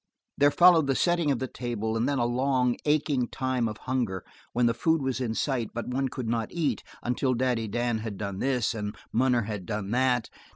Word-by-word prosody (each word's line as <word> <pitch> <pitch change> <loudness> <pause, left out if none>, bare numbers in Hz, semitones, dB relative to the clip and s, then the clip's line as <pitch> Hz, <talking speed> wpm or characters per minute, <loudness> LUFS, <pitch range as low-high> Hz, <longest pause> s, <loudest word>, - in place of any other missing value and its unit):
There 145 0 +5
followed 170 -2 +6
the 135 - +2
setting 175 -1 +2
of 135 - +2
the 130 - -3
table, 115 -3 -3
and 115 +4 +1
then 140 - 0
a 120 - +2
long, 125 0 +1
aching 150 -4 +1
time 130 -2 -1
of 105 -1 -5
hunger 120 -8 -1 0.3
when 120 +1 +2
the 115 - +3
food 160 +8 +2
was 130 -2 -2
in 115 -3 -1
sight, 125 -4 -1
but 120 +1 -3
one 135 +2 0
could 125 -2 -5
not 115 -1 -1
eat 165 -4 -1 0.2
until 125 +1 0
Daddy 120 -2 0
Dan 120 +1 -1
had 110 -2 -5
done 100 -2 -4
this, 125 -4 +1
and 105 -1 -4 0.2
Munner 125 0 +3
had 100 -4 -5
done 105 -1 -3
that. 125 -2 +2
125 Hz, 210 wpm, -27 LUFS, 115-135 Hz, 0.3 s, followed